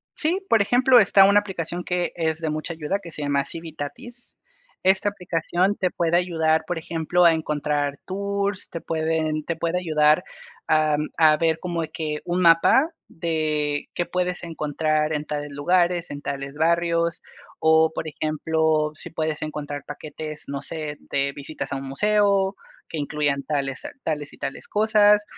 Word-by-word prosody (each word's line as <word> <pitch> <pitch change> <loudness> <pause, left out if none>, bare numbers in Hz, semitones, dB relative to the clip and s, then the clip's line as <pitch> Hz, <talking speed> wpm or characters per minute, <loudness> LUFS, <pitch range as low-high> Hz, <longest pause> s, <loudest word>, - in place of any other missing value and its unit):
Sí, 360 +5 +1
por 225 - +4
ejemplo, 245 +4 +5
está 195 -2 +6
una 200 +1 +6
aplicación 180 -3 -4
que 180 0 -1
es 160 -2 -1
de 160 -1 -2
mucha 155 +2 -4
ayuda 165 +5 -2
que 175 -4 -11
se 150 - -6
llama 140 -1 +1
Civitatis, 170 - -7 0.5
esta 190 +2 +3
aplicación 180 0 -1
te 185 - +1
puede 170 0 +1
ayudar, 160 -3 +1
por 175 - -2
ejemplo, 165 +2 0
a 170 -1 +7
encontrar 150 -2 -1
tours, 200 +1 -2
te 170 - -6
pueden 160 -1 -1
te 170 - -2
puede 165 +2 -1
ayudar 155 -3 +3 0.4
a 155 -1 +3 0.2
a 155 -1 +6
ver 160 -1 +2
como 170 -1 -3
que 155 -2 -3
un 175 +1 0
mapa 170 - +5 0.2
de 155 -3 -1
qué 175 - 0
puedes 180 0 -2
encontrar 155 -1 -1
en 150 0 -3
tales 145 -1 -4
lugares, 175 +4 +1
en 145 0 -6
tales 140 -1 -4
barrios, 170 +2 +1 0.4
o, 160 0 +4
por 160 - -4
ejemplo, 155 0 0
si - - -4
puedes 155 -1 -2
encontrar 145 -2 -5
paquetes, 155 +1 -7
no 140 -1 -3
sé, 150 -1 -4
de 140 0 -1
visitas 145 +3 -6
a 140 - -1
un 135 0 -6
museo, 200 +5 +2 0.3
que - - -5
incluyan 145 -1 0
tales, 140 -2 -2 0.2
tales 150 -2 -3
y - - -14
tales 135 - -5
cosas, 210 -1 +4
160 Hz, 160 wpm, -24 LUFS, 150-180 Hz, 0.5 s, a